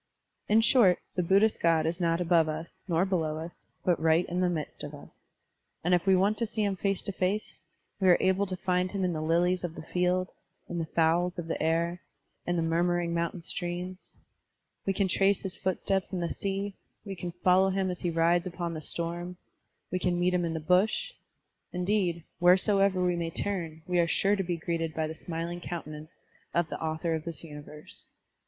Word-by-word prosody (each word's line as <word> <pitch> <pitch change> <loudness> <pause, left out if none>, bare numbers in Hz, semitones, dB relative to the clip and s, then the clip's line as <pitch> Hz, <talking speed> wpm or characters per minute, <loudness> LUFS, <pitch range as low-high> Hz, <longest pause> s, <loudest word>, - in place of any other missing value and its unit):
In 215 +2 +6
short, 225 -5 +5 0.2
the 180 - 0
Buddhist 200 +5 +3
God 165 -2 +3
is 170 +3 -1
not 165 0 +2
above 170 -2 +3
us, 155 +2 -6
nor 170 0 +2
below 160 -5 0
us, 165 +2 -9
but 175 -3 +2
right 160 +2 +4
in 175 +1 -3
the 180 -1 +2
midst 160 -4 -4
of - - -6
us; - - -16 0.6
and 175 +2 +2
if 175 +2 +2
we 190 - +6
want 200 +3 +2
to 230 - 0
see 215 0 -1
him 200 -1 +1
face 195 0 0
to - - -1
face, 195 +3 -2 0.4
we 190 - +2
are 180 - +7
able 190 +2 +2
to 185 -1 -4
find 180 0 0
him 195 0 -2
in 180 - 0
the 155 - -3
lilies 175 +3 +2
of 170 -2 -4
the - - -7
field, 180 +2 0 0.4
in 175 - -3
the 165 - -2
fowls 170 +3 +2
of 175 - -4
the 165 - -3
air, 170 +3 0 0.5
in 175 - +1
the 165 - +1
murmuring 170 +1 +1
motmtain 170 +1 -2
streams; 180 +2 -5 0.7
we 195 - +2
can 195 0 +1
trace 195 +1 +2
his 190 -2 -4
footsteps 190 +1 -1
in 185 - -2
the 170 -1 -2
sea, 195 0 -2 0.3
we 195 -2 -5
can 175 0 -5
follow 185 +2 +3
him 190 -1 0
as 180 - -5
he 175 - -1
rides 170 +2 +2
upon 175 -1 -4
the 155 - -5
storm; 175 +3 -3 0.5
we 185 - 0
can 175 -1 0
meet 180 +1 +2
him 175 -1 +1
in 165 -1 -2
the - - -1
bush; 190 - +2 0.6
indeed, 180 -2 0 0.2
wheresoever 185 +1 +4
we 180 -1 +2
may 170 -1 -2
turn, 165 -3 -3
we 180 -1 +1
are 170 - +3
sure 195 +4 +2
to 195 - -1
be 175 -2 -2
greeted 165 -1 -2
by 160 - 0
the 155 - -4
smiling 170 +1 -5
countenance 155 -2 -7 0.3
of 170 -1 +2
the - - -5
author 160 +1 -1
of 160 -1 -2
this 170 0 -4
universe. 150 -1 -9
175 Hz, 205 wpm, -29 LUFS, 165-185 Hz, 0.7 s, are